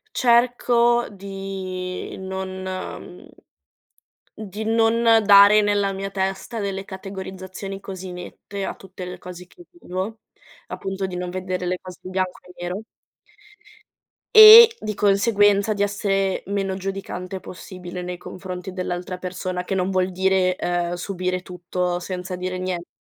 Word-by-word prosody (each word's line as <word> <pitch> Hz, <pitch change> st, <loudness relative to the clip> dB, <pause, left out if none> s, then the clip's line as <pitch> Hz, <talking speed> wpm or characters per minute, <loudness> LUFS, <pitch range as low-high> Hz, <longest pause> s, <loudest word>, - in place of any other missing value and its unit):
Cerco 240 Hz, -1 st, +3 dB
di 195 Hz, -2 st, -6 dB
non 190 Hz, 0 st, -5 dB
mhmm, 185 Hz, -1 st, -7 dB, 1.1 s
di 215 Hz, 0 st, -6 dB
non 225 Hz, +1 st, +2 dB, 0.2 s
dare 205 Hz, +1 st, +8 dB
nella 205 Hz, -1 st, +1 dB
mia 195 Hz, +1 st, -4 dB
testa 195 Hz, +4 st, -3 dB
delle 195 Hz, -1 st, -3 dB
categorizzazioni 190 Hz, 0 st, -7 dB
così 190 Hz, -2 st, -7 dB
nette 195 Hz, +2 st, -7 dB
a -, -, -4 dB
tutte 185 Hz, -1 st, -10 dB
le 180 Hz, -, -7 dB
cose 180 Hz, 0 st, -10 dB
che 350 Hz, -, -17 dB
vivo, 220 Hz, -, -5 dB, 0.5 s
appunto 195 Hz, 0 st, -4 dB
di 180 Hz, -1 st, -6 dB
non 180 Hz, 0 st, -4 dB
vedere 185 Hz, 0 st, -3 dB
le 180 Hz, 0 st, -1 dB
cose 185 Hz, -1 st, -11 dB
bianco 185 Hz, 0 st, -3 dB
e 180 Hz, -, -13 dB
nero 180 Hz, +4 st, -3 dB, 1.6 s
e, 445 Hz, +1 st, +12 dB
di 215 Hz, -, -3 dB
conseguenza, 205 Hz, 0 st, +3 dB
di 205 Hz, 0 st, 0 dB
essere 195 Hz, -1 st, 0 dB
meno 195 Hz, -1 st, -2 dB
giudicante 190 Hz, -1 st, -5 dB
possibile 180 Hz, 0 st, -8 dB
nei 180 Hz, 0 st, -5 dB
confronti 185 Hz, +1 st, -7 dB
dell'altra 180 Hz, 0 st, -4 dB
persona, 180 Hz, 0 st, -4 dB
che 195 Hz, -, -2 dB
non 185 Hz, 0 st, 0 dB
vuol 185 Hz, 0 st, +1 dB
dire, 190 Hz, 0 st, +2 dB
ehm, 175 Hz, -1 st, -1 dB
subire 185 Hz, 0 st, -3 dB
tutto 180 Hz, 0 st, -3 dB
senza 180 Hz, 0 st, -5 dB
dire 185 Hz, 0 st, -3 dB
niente,, 180 Hz, -1 st, -4 dB
190 Hz, 135 wpm, -23 LUFS, 180-200 Hz, 1.6 s, e